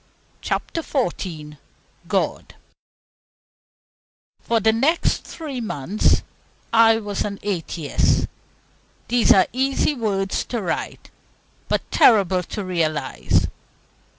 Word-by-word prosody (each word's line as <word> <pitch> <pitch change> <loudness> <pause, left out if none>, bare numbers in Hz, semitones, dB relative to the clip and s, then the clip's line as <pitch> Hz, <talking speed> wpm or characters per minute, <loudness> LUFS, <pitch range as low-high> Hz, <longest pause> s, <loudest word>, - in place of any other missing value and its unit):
CHAPTER 330 - -2
XIV 170 - -3 0.5
GOD - - -2 1.8
For 230 -1 0
the 220 +1 +3
next 285 +9 +1
three 285 -6 -6
months 200 - +1 0.5
I 225 0 +6
was 205 -3 -3
an 200 -1 -4
atheist! 170 -6 0 0.8
These 245 -1 +4
are 190 - +6
easy 270 +3 +1
words 200 -6 -1
to 240 - -3
write, 180 -6 -4 0.6
but - - +1
terrible 190 -5 +5
to 195 +3 -6
realize. 155 -6 0
205 Hz, 95 wpm, -22 LUFS, 180-235 Hz, 1.8 s, I